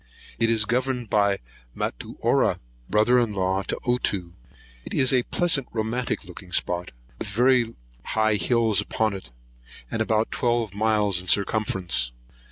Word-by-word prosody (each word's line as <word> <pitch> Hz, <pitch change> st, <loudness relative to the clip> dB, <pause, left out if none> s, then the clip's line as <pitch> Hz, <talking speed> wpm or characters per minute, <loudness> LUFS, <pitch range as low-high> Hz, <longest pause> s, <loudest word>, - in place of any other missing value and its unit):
It 115 Hz, -1 st, +3 dB
is 110 Hz, -2 st, +2 dB
governed 125 Hz, 0 st, -1 dB
by 100 Hz, -1 st, +3 dB, 0.4 s
Matuara, -, -, 0 dB, 0.3 s
brother 110 Hz, +5 st, +4 dB
in 115 Hz, -3 st, 0 dB
law 95 Hz, 0 st, 0 dB
to -, -, -3 dB
Ottoo. 100 Hz, -8 st, -1 dB, 0.5 s
It -, -, -6 dB
is 130 Hz, -1 st, +4 dB
a 125 Hz, -, +4 dB
pleasant 145 Hz, -1 st, +1 dB
romantic 115 Hz, +3 st, -2 dB
looking 90 Hz, 0 st, -11 dB
spot, 90 Hz, 0 st, 0 dB, 0.3 s
with -, -, -4 dB
very 120 Hz, +2 st, +2 dB, 0.3 s
high 110 Hz, 0 st, +1 dB
hills 110 Hz, -2 st, +2 dB
upon 110 Hz, +1 st, -1 dB
it, 95 Hz, -10 st, -8 dB, 0.6 s
and 110 Hz, -, -1 dB
about 110 Hz, 0 st, +1 dB
twelve 120 Hz, -4 st, 0 dB
miles 105 Hz, -3 st, +1 dB
in 90 Hz, -, -12 dB
circumference. 95 Hz, -, +1 dB
110 Hz, 140 wpm, -25 LUFS, 100-120 Hz, 0.6 s, brother